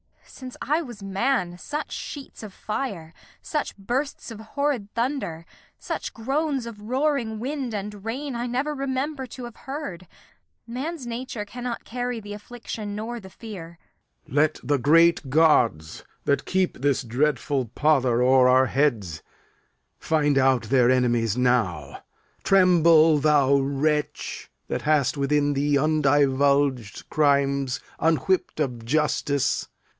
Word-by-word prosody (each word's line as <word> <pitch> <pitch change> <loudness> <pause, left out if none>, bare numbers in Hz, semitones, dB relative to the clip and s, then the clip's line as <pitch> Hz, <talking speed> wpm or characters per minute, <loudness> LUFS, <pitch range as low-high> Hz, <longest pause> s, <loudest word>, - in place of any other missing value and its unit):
Since 255 -2 -10
I 305 +4 +1
was 240 -9 -9
man, 195 -2 -1
Such 300 +8 -5
sheets 285 -2 -7
of 215 -3 -8
fire, 195 -6 -5 0.3
such 300 -8 -3
bursts 250 +6 -3
of 220 - -8
horrid 230 -2 -2
thunder, 230 - -2 0.3
Such - - -5
groans 270 +2 -1
of 225 -3 -9
roaring 250 -1 -1
wind 260 -2 -3
and 205 0 -6
rain, 265 +5 -4
I 240 +1 -3
never 265 +5 -1
Remember 270 0 -3
to 250 +2 -9
have 240 -2 -8
heard. 265 - -7 0.6
Man's 270 +5 -5
nature 235 -2 -5
cannot 245 +2 -5
carry 245 0 -3
Th' 205 -1 -10
affliction 210 -1 -7
nor 230 +3 -5
the 190 -3 -12
fear. 185 -6 -10 0.5
Lear. - - -9
Let 155 0 +1
the 140 +2 +1
great 165 +1 +4
gods, 125 - +2 0.2
That 140 - +1
keep 185 -1 0
this 140 -1 +1
dreadful 135 +2 0
pudder 130 -5 +3
o'er 130 0 +5
our 130 +1 +5
heads, 115 - 0 0.8
Find 145 -3 +2
out 130 -2 +3
their 125 -3 +3
enemies 120 -3 +2
now. 110 - 0 0.4
Tremble, 170 -5 +5
thou 140 -2 +4
wretch, 145 +2 -2 0.2
That - - -2
hast 150 -3 +2
within 145 +1 +1
thee 145 +1 +2
undivulged 140 -4 +2
crimes 140 -3 +2 0.2
Unwhipp'd 165 +3 +1
of 125 -6 -2
justice. 145 +1 0
165 Hz, 130 wpm, -24 LUFS, -, 0.8 s, o'er